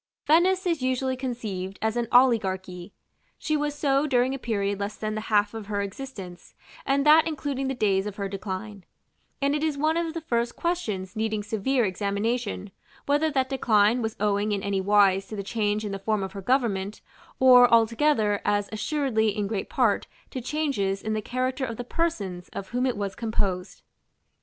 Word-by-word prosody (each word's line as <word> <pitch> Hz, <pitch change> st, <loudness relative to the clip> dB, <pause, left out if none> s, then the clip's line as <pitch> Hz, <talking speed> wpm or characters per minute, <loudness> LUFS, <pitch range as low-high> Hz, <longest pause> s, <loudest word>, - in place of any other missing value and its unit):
§ -, -, -68 dB
III. -, -, -68 dB
Venice 375 Hz, +2 st, +1 dB
is 335 Hz, -5 st, 0 dB
usually 260 Hz, 0 st, 0 dB
conceived 215 Hz, -7 st, -4 dB
as 220 Hz, +1 st, -1 dB
an 240 Hz, -1 st, -1 dB
oligarchy: 190 Hz, -7 st, +2 dB, 0.5 s
She 310 Hz, -, -1 dB
was 295 Hz, -1 st, -1 dB
so 280 Hz, 0 st, +1 dB
during 255 Hz, -1 st, +2 dB
a 270 Hz, -, -4 dB
period 200 Hz, -4 st, -1 dB
less 205 Hz, +1 st, -3 dB
than 215 Hz, 0 st, -3 dB
the 215 Hz, -, -3 dB
half 205 Hz, -1 st, +3 dB
of 220 Hz, -3 st, -7 dB
her 205 Hz, -1 st, -2 dB
existence, 195 Hz, -4 st, -8 dB, 0.3 s
and 275 Hz, +1 st, +2 dB
that 310 Hz, +2 st, +7 dB
including 280 Hz, -3 st, -3 dB
the 265 Hz, -, -2 dB
days 200 Hz, -3 st, +1 dB
of 205 Hz, -, -6 dB
her 200 Hz, -1 st, -3 dB
decline; 195 Hz, +1 st, -6 dB, 0.6 s
and 280 Hz, +1 st, +2 dB
it 300 Hz, +1 st, -1 dB
is 310 Hz, -3 st, 0 dB
one 310 Hz, +3 st, +1 dB
of 335 Hz, -1 st, -2 dB
the 330 Hz, -, -3 dB
first 235 Hz, -5 st, -1 dB
questions 215 Hz, -, -2 dB
needing 215 Hz, -1 st, -1 dB
severe 225 Hz, +4 st, 0 dB
examination, 205 Hz, +2 st, -2 dB, 0.3 s
whether 295 Hz, +2 st, +2 dB
that 265 Hz, -3 st, 0 dB
decline 230 Hz, -3 st, +3 dB
was 220 Hz, -1 st, -3 dB
owing 205 Hz, 0 st, +1 dB
in 200 Hz, -1 st, -2 dB
any 200 Hz, -1 st, 0 dB
wise 195 Hz, -1 st, +3 dB
to 215 Hz, -, -7 dB
the 200 Hz, -, -4 dB
change 210 Hz, 0 st, -1 dB
in 205 Hz, -, -3 dB
the 195 Hz, -, -4 dB
form 210 Hz, 0 st, -1 dB
of 190 Hz, -, -5 dB
her 195 Hz, -, -7 dB
government, 210 Hz, -4 st, 0 dB, 0.4 s
or 250 Hz, -1 st, +7 dB
altogether, 230 Hz, -2 st, +3 dB
as 205 Hz, 0 st, 0 dB
assuredly 225 Hz, -1 st, 0 dB
in 205 Hz, -, 0 dB
great 200 Hz, -1 st, -3 dB
part, -, -, +1 dB, 0.2 s
to 255 Hz, -, -4 dB
changes, 240 Hz, -9 st, -1 dB
in 220 Hz, -, -1 dB
the 215 Hz, -, -1 dB
character 255 Hz, +4 st, -2 dB
of 230 Hz, -4 st, -3 dB
the 245 Hz, -, -4 dB
persons 210 Hz, -, -3 dB
of 195 Hz, -, -6 dB
whom 250 Hz, +2 st, 0 dB
it 250 Hz, -, -1 dB
was 200 Hz, -1 st, -3 dB
composed. 200 Hz, -5 st, -2 dB
220 Hz, 190 wpm, -26 LUFS, 200-265 Hz, 0.6 s, that